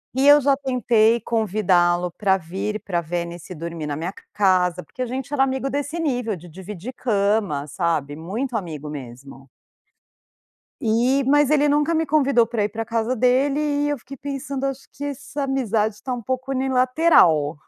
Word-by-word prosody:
E 270 +2 +3
eu 290 +1 +9
já 280 -1 +3
tentei 240 -4 +2
convidá-lo 180 -6 +1
para 195 0 +1
vir 195 +5 -4
para 175 -3 -1
Venice 170 +1 -5
dormir 165 -1 -5
na 145 - -2
minha 170 +5 -4 0.2
casa, 180 -3 +2
porque 255 - -10
a 250 - -1
gente 260 +3 -5
era 275 - +1
amigo 265 0 -1
desse 290 +4 -3
nível 245 - -1
de 175 +1 -12
dividir 190 +7 -8
cama, 200 - 0
sabe 155 -2 -2
muito 220 - -4
amigo 155 -7 -4
mesmo. 135 0 -10 1.3
E 245 +4 +2
mas 290 +1 +4
ele 295 -1 +3
nunca 295 +3 +2
me 320 0 +1
convidou 280 -5 +3
para 225 -2 -1
ir 205 - 0
pra 225 +2 -4
casa 230 +2 -1
dele, 260 +4 +2
e 290 -1 0
eu 290 - -1
fiquei 275 +3 -11
pensando, 275 0 -4
acho 275 0 -4
que 285 - -7
essa 285 0 -5
amizade 225 -6 0
está 255 +5 -5
um 245 - -4
pouco 260 +3 -3
unilateral, 255 - +3
230 Hz, 170 wpm, -22 LUFS, 180-270 Hz, 1.3 s, eu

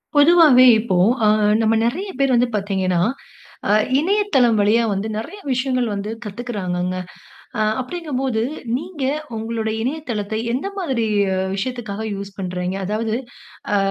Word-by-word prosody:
பொதுவாவே 290 -4 +7
இப்போ 215 -4 -1 0.3
ஆ - - +5 0.3
நம்ம 225 0 +3
நெறைய 360 - -2
பேர் 275 -1 +3
வந்து 245 +1 +3
பார்த்தீங்கன்னா, 190 -3 0 0.7
ஆ - - +4 0.3
இணையதளம் 320 - +2
வழியா 220 +3 +3
வந்து 200 +2 -2
நெறைய 325 - -6
விஷயங்கள் 255 -1 0
வந்து 200 +1 -4
கத்துக்குறாங்கங்க. 190 -5 -3 0.6
ஆ - - +1 0.2
அப்டிங்க 320 +4 -6
போது 250 -5 0 0.3
நீங்க 315 0 -5 0.3
உங்களுடைய 220 0 -2
இணையதளத்தை 230 -6 -3
எந்த 265 +10 -2
மாதிரி 265 -11 -1 0.5
விஷயத்துக்காக 220 0 -4
யூஸ் 200 0 -7
பண்றீங்க. 180 0 -3
அதாவது 215 +2 -1 0.6
ஆ - - +4
230 Hz, 125 wpm, -20 LUFS, 205-270 Hz, 0.7 s, பொதுவாவே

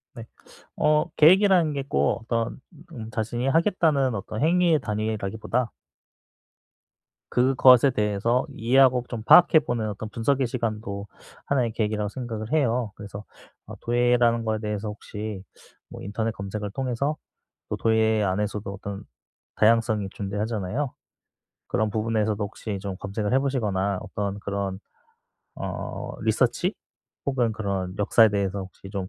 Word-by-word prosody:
네. 115 - -8 0.5
어 150 +2 +2
계획이라는 180 -1 +5
게 140 -1 -3
꼭 70 +10 +1
어떤 115 +1 -2 0.3
음 115 -7 -7
자신이 115 +3 -2
하겠다는 155 - +2
어떤 110 +3 -5
행위의 170 -1 +4
단위라기보다 110 +1 -2 1.6
그것에 130 +1 +5
대해서 105 +2 0
이해하고 125 +1 +4
좀 115 -3 -5
파악해 170 +5 +7
보는 115 -6 -2
어떤 105 +1 -6
분석의 130 +3 0
시간도 110 -4 -4 0.4
하나의 125 -5 +1
계기라고 105 -2 -1
생각을 115 -1 -6
해요. 125 -7 +1
그래서 100 0 -9 0.4
어 - - -9
도예라는 120 -1 +2
거에 110 -1 0
대해서 105 0 -3
혹시 105 -1 -7 0.5
뭐 - - -10
인터넷 110 +3 -2
검색을 105 0 -5
통해서 135 +5 -2 0.5
또 - - -2
도예 110 -1 +2
안에서도 105 +1 -2
어떤 100 0 -7 0.5
다양성이 110 -2 +2
존재하잖아요. 105 +6 -3 0.7
그런 110 +1 0
부분에서도 110 -1 -1
혹시 100 0 -5
좀 100 -2 -4
검색을 105 +2 -3
해 130 - +5
보시거나 100 -8 -1
어떤 100 -1 -4
그런 100 -1 -3 0.8
어 - - -5
리서치? - - +1 0.5
혹은 125 -4 +1
그런 100 -4 -3
역사에 110 +2 +5
대해서 100 -1 -1
혹시 95 +1 -10
좀 95 -3 -4
110 Hz, 305 characters per minute, -25 LUFS, 105-125 Hz, 1.6 s, 파악해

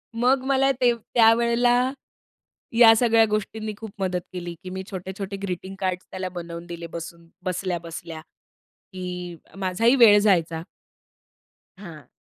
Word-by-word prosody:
मग 255 +3 +2
मला 270 0 +3
ते 240 -1 +5
त्यावेळेला 235 +2 +3 0.9
या 225 -2 +9
सगळ्या 225 -1 +4
गोष्टींनी 215 +1 -3
खूप 220 -1 -8
मदत 185 -2 -1
केली, 175 -1 -5
की 185 - -7
मी 190 +1 -5
छोटे-छोटे 190 +1 -6
ग्रीटिंग 190 +1 -5
कार्ड्स 185 -1 -2
त्याला 185 0 -4
बनवून 170 -1 -7
दिले 170 -1 -7
बसून 170 0 -8 0.2
बसल्या-बसल्या 170 -3 -4 0.7
की 180 -1 -6 0.2
माझाही 200 +7 +2
वेळ 215 -5 +7
जायचा. 170 -6 +2 1.2
हां. 170 -7 -11
190 Hz, 125 wpm, -24 LUFS, 175-225 Hz, 1.2 s, या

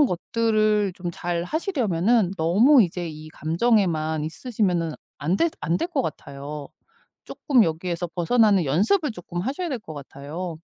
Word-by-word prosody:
그런 - - +3
것들을 215 0 +1
좀 180 -1 -5
잘하시려면은 195 - 0
너무 220 - +5
이제 175 -2 -3
이 155 0 -9
감정에만 160 -4 +1
있으시면은 175 -3 -1 0.3
안 165 +6 0
될 335 - +2
안 165 +3 0
될 340 - -2
것 290 -7 0
같아요. 140 0 -6 0.6
쪼끔 255 -6 +2
여기에서 170 +1 -2
벗어나는 195 +3 +3
연습을 225 - +2
쪼끔 175 -3 -7
하셔야 285 - -3
될 260 -5 -3
것 160 -6 -10
같아요. 150 +5 -7
180 Hz, 320 characters per minute, -24 LUFS, 160-230 Hz, 0.6 s, 너무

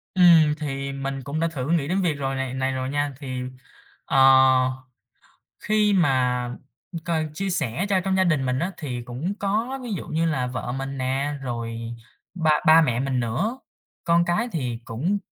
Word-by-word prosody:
Ừm, 165 -4 +6
thì 140 -2 -4
mình 135 0 -4
cũng 145 +3 -4
đã 165 - +2
thử 145 -3 -4
nghĩ 155 -4 +1
đến 190 +3 0
việc 170 -4 +1
rồi 135 -1 -3
này 135 -1 -3
này 130 0 -1
rồi 130 0 -3
nha. 145 0 -1
Thì, 130 -3 -5 0.6
ờ, 135 - +2 1.4
khi 210 -1 +2
mà 130 -8 +2 0.4
m - - -6
cần 160 -2 -1
chia 195 +3 -2
sẻ 155 - -1
cho 190 -2 +2
trong 190 +1 0
gia 190 - +3
đình 150 -6 +1
mình 125 +1 0
á, 180 +6 -1
thì 125 -6 -5
cũng 130 +11 -4
có 225 +7 -1
ví 235 -3 -5
dụ 185 - -4
như 160 +2 0
là 135 -6 0
vợ 125 0 -4
mình 135 +1 -4
nè, 135 +3 -1
rồi 115 -2 -4 0.5
ba 160 -3 +1 0.2
ba 160 +1 +8
mẹ 120 -4 0
mình 130 -2 0
nữa, 185 - -1 0.5
con 170 0 +3
cái 215 +8 0
thì 125 -7 -2
cũng 165 - -1
145 Hz, 190 wpm, -24 LUFS, 130-175 Hz, 1.4 s, ba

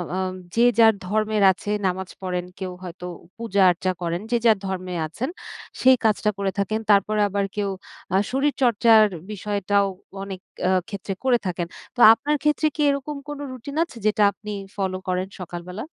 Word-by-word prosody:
আ - - -1 0.4
যে 230 - +3 0.2
যার 225 -1 +7
ধর্মের 215 +1 +1
আছে 190 +2 -7 0.2
নামাজ 185 0 -3
পড়েন, 180 -1 -2
কেউ 185 -1 -4
হয়তো 180 0 -8 0.3
পূজা-আর্চা 190 -5 +2
করেন, 170 +2 -2
যে 240 - +4
যার 220 -3 +6
ধর্মে 185 -1 -4
আছেন 250 - -4 0.5
সেই 260 0 +7
কাজটা 210 0 +2
করে 195 -1 -1
থাকেন। 215 +3 0
তারপরে 210 +2 +3
আবার 200 0 0
কেউ 205 -1 -1 0.5
আ - - +6
শরীরচর্চার 240 -5 +4 0.3
বিষয়টাও 200 -1 0 0.4
অনেক 195 -2 -6 0.3
আ - - +3 0.2
ক্ষেত্রে 200 -2 -5
করে 250 -2 +4
থাকেন। 175 -1 -2 0.3
তো - - -9
আপনার 295 +6 -1
ক্ষেত্রে 300 +1 +2
কি 300 - -2
এরকম 280 +1 -2
কোন 295 -1 -5
রুটিন 255 +3 -8
আছে 335 -8 -10
যেটা 215 0 +3
আপনি 210 +1 -9 0.2
ফলো 190 -2 -1
করেন 185 +1 -1
সকালবেলা? 180 +3 -6
205 Hz, 160 wpm, -23 LUFS, 185-230 Hz, 0.5 s, যার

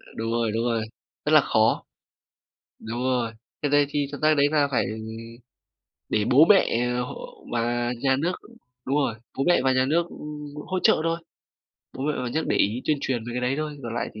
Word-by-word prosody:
Đúng 115 0 -3
rồi, 115 -1 0
đúng 115 +2 -1
rồi, 115 -2 0 0.4
rất - - +1
là - - +8
khó! - - +2 1.0
Đúng 115 +2 -5
rồi. 125 -3 0 0.3
Cái 145 - 0
đấy 145 0 +5
thì 145 -1 -1
thực 145 - -7
ra 155 0 +5
đấy 140 0 +4
là 150 -2 +3
phải 125 - +2 1.2
để 105 - +1
bố 135 +5 +8
mẹ 205 -2 +6 0.4
h - - -7 0.4
và 120 +1 0
nhà 135 -1 +3
nước 170 +5 0 0.5
đúng 135 +2 +1
rồi, 135 -6 +1 0.2
bố 135 - +1
mẹ 175 - +5
và 130 - +4
nhà 130 0 +3
nước, 170 +3 +2
ưm, 150 -2 -8
hỗ 185 - -1
trợ - - +5
thôi, 165 0 0 0.8
bố 130 - -4
mẹ 150 - +1
và - - -3
nhà 120 - -3
nước 160 - 0
để - - +2
ý 110 +6 +1
tuyên 150 -2 +1
truyền 130 -3 -1
về 120 - -6
cái 125 - -1
đấy 125 +2 0
thôi, 150 -1 -4
còn 115 -1 -5
lại 120 - -2
thì 110 - -9
135 Hz, 215 wpm, -25 LUFS, 120-150 Hz, 1.2 s, là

